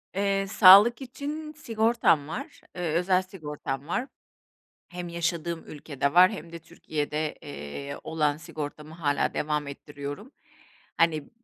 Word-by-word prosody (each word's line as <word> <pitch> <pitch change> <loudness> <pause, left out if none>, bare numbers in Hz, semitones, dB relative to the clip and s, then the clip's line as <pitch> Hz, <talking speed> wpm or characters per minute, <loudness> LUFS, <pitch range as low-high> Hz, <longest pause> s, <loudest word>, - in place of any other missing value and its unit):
Eee, 195 0 +1
sağlık 205 +5 +8
için 295 +4 -6
sigortam 225 - +2
var, 275 - -7 0.2
ııı, 180 - -2
özel 180 +3 +2
sigortam 150 -6 -6
var. 250 +9 -1 0.8
Hem 175 -1 -6
yaşadığım 170 -1 -2
ülkede 140 -2 -3
var 185 +4 +7
hem 170 -5 -8
de 170 - -7
Türkiye'de, 150 -1 -4
eee, 140 - -7
olan 150 -2 0
sigortamı 150 0 -7
hâlâ 145 -4 0
devam 150 -1 -1
ettiriyorum. 145 - -8 0.7
Hani, 155 -3 +2
165 Hz, 120 wpm, -27 LUFS, 150-195 Hz, 0.8 s, sağlık